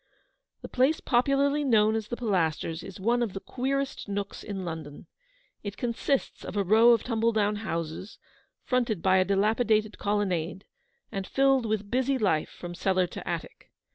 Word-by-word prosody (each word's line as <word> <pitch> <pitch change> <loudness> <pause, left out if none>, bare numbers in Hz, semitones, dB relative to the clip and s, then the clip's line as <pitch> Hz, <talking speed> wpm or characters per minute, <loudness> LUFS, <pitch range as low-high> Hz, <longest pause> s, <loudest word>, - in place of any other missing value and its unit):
The - - -5
place 265 +5 +2
popularly 280 +3 +2
known 220 -5 +4
as 220 -1 -2
the 240 - -4
Pilasters 165 -6 -1
is 195 0 -10
one 235 +5 +1
of 225 -6 -1
the 195 - -4
queerest 270 +1 -3
nooks 200 0 -4
in 195 -3 -5
London. 160 -3 -7 0.6
It 205 -1 -6
consists 245 +3 -1
of - - -6
a 200 - +2
row 220 +5 +5
r 240 - +8
of 225 - -5
tumble 230 -1 +1
down 210 -1 +1
houses, 170 -2 -5 0.5
fronted 240 -8 0
by 190 0 +4
a 185 - +3
dilapidated 215 +2 +1
colonnade, 190 -3 -1 0.5
and 195 -3 -4
filled 270 -3 +3
with 210 -1 -2
busy 260 +2 +1
life 190 -10 +1
from 175 -1 -8
cellar 185 +1 +1
to 175 - -9
attic. - - -5
210 Hz, 170 wpm, -28 LUFS, 190-245 Hz, 0.6 s, r